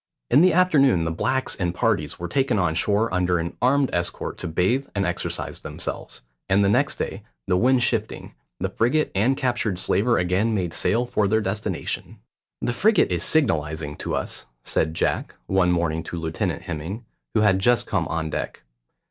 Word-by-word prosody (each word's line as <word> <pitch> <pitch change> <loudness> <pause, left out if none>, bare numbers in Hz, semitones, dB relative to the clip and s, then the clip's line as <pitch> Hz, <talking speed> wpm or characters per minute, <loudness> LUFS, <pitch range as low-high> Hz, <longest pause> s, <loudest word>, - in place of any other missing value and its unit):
In 135 +5 +6
the 185 +1 +6
afternoon 145 - +4
the 80 - -1
blacks 130 +10 -1
in 90 -2 -2
parties 90 -8 0
were 85 - -5
taken 135 0 +1
on 90 -4 +1
shore 105 +6 +1
under 90 -1 +2
an 85 +1 -4
armed 135 +2 +3
escort 85 0 -2
to 90 - -4
bathe 95 - 0
and 100 -1 +1
exercise 90 - -3
themselves; - - -6 0.3
and 100 +1 +4
the - - +3
next 105 - +2
day, - - -4 0.2
the 90 - +1
wind 125 +5 +3
shifting, 110 -2 -2 0.3
the - - -1
frigate 145 +7 +1
and 120 +8 +2
captured 120 -7 -1
slaver 115 +5 +1
again 95 +5 +1
made 90 -4 -2
sail 120 +2 +1
for 105 -4 0
their 110 +2 +2
destination. 105 0 -3 0.5
"The 120 - 0
frigate 210 - +3
is 85 -1 0
signalising 80 - +1
to - - -2
us," - - -4 0.2
said 80 0 0
Jack - - -1
one 90 +4 +2
morning 85 -2 0
to 85 - -5
Lieutenant 85 +1 -3
Hemming, 90 +6 -5 0.3
who 110 - +4
had 95 -3 +4
just 120 +5 +3
come - - -1
on 80 -1 -3
deck. - - -4
100 Hz, 180 wpm, -23 LUFS, 85-120 Hz, 0.5 s, In